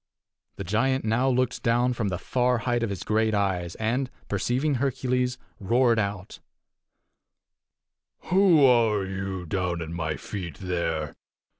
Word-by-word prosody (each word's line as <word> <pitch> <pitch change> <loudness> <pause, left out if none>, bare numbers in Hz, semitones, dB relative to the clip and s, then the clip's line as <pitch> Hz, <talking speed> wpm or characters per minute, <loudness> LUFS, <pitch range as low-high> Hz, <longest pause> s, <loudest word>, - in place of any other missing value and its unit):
The - - -5
giant 125 +7 0
now 120 +5 +2
looked 130 -1 0
down 120 +1 +2
from 115 -4 -2
the 90 -2 -2
far 125 +5 +1
height 120 0 -1
of 115 - -1
his 95 -2 -5
great 110 0 +1
eyes, 95 -3 -1
and, 125 +4 -1 0.2
perceiving 125 +8 0
Hercules, 125 -2 0 0.2
roared 115 +3 +3
out: 100 -2 -4 1.9
"Who 180 -6 +6
are 115 -6 +3
you, 95 -1 -4
down 90 0 -2
at 80 -1 -5
my 80 -2 -3
feet, 85 -7 -6
there? 85 -4 -2
110 Hz, 135 wpm, -26 LUFS, 95-125 Hz, 1.9 s, Who